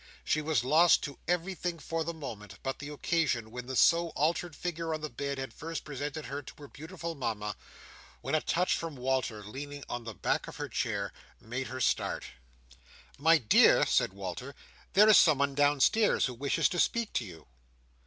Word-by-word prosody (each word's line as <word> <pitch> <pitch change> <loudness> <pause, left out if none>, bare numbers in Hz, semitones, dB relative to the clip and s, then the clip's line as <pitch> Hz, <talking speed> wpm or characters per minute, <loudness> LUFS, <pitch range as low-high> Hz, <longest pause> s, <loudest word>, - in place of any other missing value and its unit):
She 155 - +1
was 150 -6 +1
lost 155 +6 +5
to 140 - -6
everything 180 0 -1
for 165 0 -3
the 170 - -3
moment, 105 - -8
but 135 0 -3
the 145 - -7
occasion 145 -7 -1
when 125 +1 -7
the 130 - -4
so 170 +5 +4
altered 165 +2 0
figure 165 -2 -3
on 155 - -7
the 155 - -5
bed 140 -1 -3
had 135 0 -5
first 165 +1 -6
presented 145 +1 -5
her 140 +1 -5
to 135 - -11
her 145 - -11
beautiful 165 +3 -7
Mama; 105 -7 -3 0.7
when - - -4
a 155 - +3
touch 180 +2 +1
from 165 -3 -5
Walter 125 -4 -1
leaning 140 +6 -7
on 120 -1 -4
the 115 -2 -7
back - - -1
of - - -9
her - - -5
chair, - - -2 0.3
made 125 +4 -5
her 130 +1 -6
start. - - 0 1.0
"My 160 +3 +6
dear," 115 -8 +5
said - - +2
Walter, 100 +8 -6 0.4
"there 210 +3 +7
is 215 - +8
someone 140 -3 +4
downstairs 145 +9 +3
who 125 - -3
wishes 140 +4 +1
to 175 - -2
speak 235 +3 +1
to - - 0
you." 90 -6 -11
145 Hz, 185 wpm, -30 LUFS, 125-165 Hz, 1.0 s, is